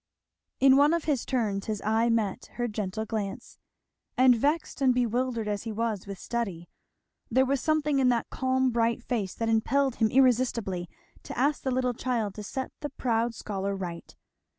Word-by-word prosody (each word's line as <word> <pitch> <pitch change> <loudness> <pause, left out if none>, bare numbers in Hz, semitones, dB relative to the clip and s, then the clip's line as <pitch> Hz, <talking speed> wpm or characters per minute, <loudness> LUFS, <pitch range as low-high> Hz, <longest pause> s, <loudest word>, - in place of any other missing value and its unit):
In 270 0 +6
one 295 +4 +5
of 335 - -2
his 285 -6 -1
turns 215 -6 -1
his 215 -2 -2
eye 225 +2 +2
met 220 -4 0
her 240 0 -2
gentle 215 -1 -3
glance; 210 -3 -5 0.6
and 255 -1 +6
vexed 290 +6 -1
and 255 -2 +4
bewildered 245 -1 0
as 205 -1 -1
he 225 - -5
was 215 -3 -2
with 195 -1 -6
study 190 -7 -4 0.6
there 260 +2 +3
was 270 0 0
something 300 -2 +1
in 255 -1 +4
that 235 -2 0
calm 260 0 +1
bright 235 +1 +1
face 215 -8 -2
that 230 - -2
impelled 250 +4 +1
him 220 -2 +3
irresistibly 230 -8 +2 0.3
to - - -8
ask 285 +4 +1
the 265 - -2
little 250 -1 0
child 230 -4 -2
to 210 - -7
set 260 +6 -4
the 290 - -4
proud 235 -3 -1
scholar 200 -2 -3
right. 175 -3 -7
235 Hz, 175 wpm, -28 LUFS, 215-260 Hz, 0.6 s, In